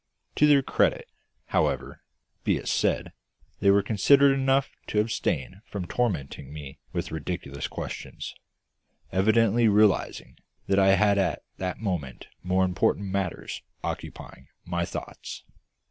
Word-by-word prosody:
To 150 Hz, -, +6 dB
their 140 Hz, -2 st, +5 dB
credit, -, -, +1 dB, 0.4 s
however, -, -, 0 dB, 0.4 s
be -, -, +2 dB
it -, -, -7 dB
said, -, -, 0 dB, 0.5 s
they 100 Hz, -, +4 dB
were 100 Hz, 0 st, +5 dB
considerate 140 Hz, +7 st, +5 dB
enough 135 Hz, 0 st, +2 dB, 0.2 s
to 105 Hz, -, +1 dB
abstain 105 Hz, -3 st, -1 dB
from 100 Hz, -3 st, -4 dB
tormenting 85 Hz, -, -2 dB
me 75 Hz, -3 st, -9 dB
with -, -, -3 dB
ridiculous 80 Hz, -3 st, -4 dB
questions, -, -, -6 dB, 0.8 s
evidently 110 Hz, +3 st, +4 dB
realising 105 Hz, -3 st, +2 dB, 0.3 s
that 100 Hz, 0 st, +2 dB
I 95 Hz, 0 st, +6 dB
had 100 Hz, 0 st, +3 dB
at 95 Hz, -4 st, 0 dB
that 90 Hz, -1 st, -3 dB
moment 85 Hz, -, -4 dB
more 95 Hz, +1 st, +2 dB
important 95 Hz, +2 st, 0 dB
matters 95 Hz, -2 st, -3 dB, 0.2 s
occupying 65 Hz, -, -6 dB, 0.2 s
my 85 Hz, -1 st, -1 dB
thoughts. -, -, -7 dB
95 Hz, 125 wpm, -27 LUFS, 90-110 Hz, 0.8 s, To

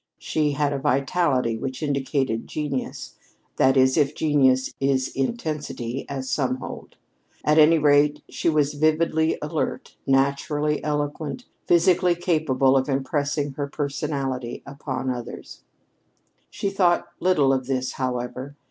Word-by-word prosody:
She 150 Hz, -2 st, 0 dB
had 145 Hz, 0 st, 0 dB
a 140 Hz, -, -2 dB
vitality 135 Hz, -3 st, +1 dB
which 130 Hz, +4 st, -4 dB
indicated 135 Hz, -4 st, -1 dB
genius 145 Hz, -4 st, -4 dB, 0.4 s
that 135 Hz, +1 st, +4 dB
is, 130 Hz, +1 st, +4 dB
if 150 Hz, -1 st, +2 dB
genius 130 Hz, -4 st, +2 dB
is 135 Hz, -1 st, +1 dB
intensity, 140 Hz, -, -3 dB
as 135 Hz, -1 st, -4 dB
some 130 Hz, -1 st, 0 dB
hold. 130 Hz, -, -9 dB, 0.5 s
At 150 Hz, +1 st, +4 dB
any 160 Hz, +2 st, +7 dB
rate, 145 Hz, -1 st, +3 dB
she -, -, -1 dB
was 150 Hz, -2 st, +2 dB
vividly 155 Hz, +1 st, +2 dB
alert, 150 Hz, +1 st, -3 dB
naturally 140 Hz, +2 st, +1 dB
eloquent, 150 Hz, -, -3 dB, 0.2 s
physically 175 Hz, +1 st, +4 dB
capable 155 Hz, -6 st, +2 dB
of 135 Hz, +2 st, +1 dB
impressing 140 Hz, +1 st, -1 dB
her 140 Hz, +1 st, -4 dB
personality 140 Hz, -4 st, -3 dB
upon 140 Hz, -2 st, -4 dB
others. 120 Hz, -2 st, -7 dB, 0.9 s
She 200 Hz, -, -3 dB
thought 180 Hz, -3 st, +2 dB
little 150 Hz, -7 st, +3 dB
of 130 Hz, -1 st, -2 dB
this, 130 Hz, -1 st, -1 dB
however. 130 Hz, +2 st, -4 dB
140 Hz, 125 wpm, -24 LUFS, 130-155 Hz, 0.9 s, any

